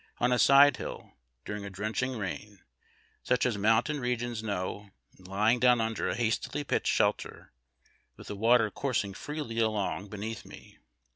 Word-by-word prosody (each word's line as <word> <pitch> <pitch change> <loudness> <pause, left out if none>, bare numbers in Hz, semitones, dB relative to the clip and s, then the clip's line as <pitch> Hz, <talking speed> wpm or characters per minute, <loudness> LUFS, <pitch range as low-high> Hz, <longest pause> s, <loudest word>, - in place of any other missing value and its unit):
on 125 - +1
a 125 - +2
side 140 +2 +7
hill - - -7 0.3
during 105 0 -5
a 100 - -6
drenching 110 +6 -3
rain, 100 0 -6 0.6
such 125 - +1
as 125 -3 +1
mountain 110 +8 +2
regions 120 -2 -2
know, 100 -1 -4 0.3
and 95 - -16
lying 105 +5 +2
down 125 -1 +5
under 110 0 -1
a - - -1
hastily 120 +5 -1
pitched - - -1
shelter, - - -1 0.7
with - - -12
the 105 - -6
water 115 +1 +3
coursing 115 -8 -2
freely 145 -1 -5
along 105 -3 -1
beneath 105 +2 -6
me. - - -14
110 Hz, 155 wpm, -29 LUFS, 105-125 Hz, 0.7 s, side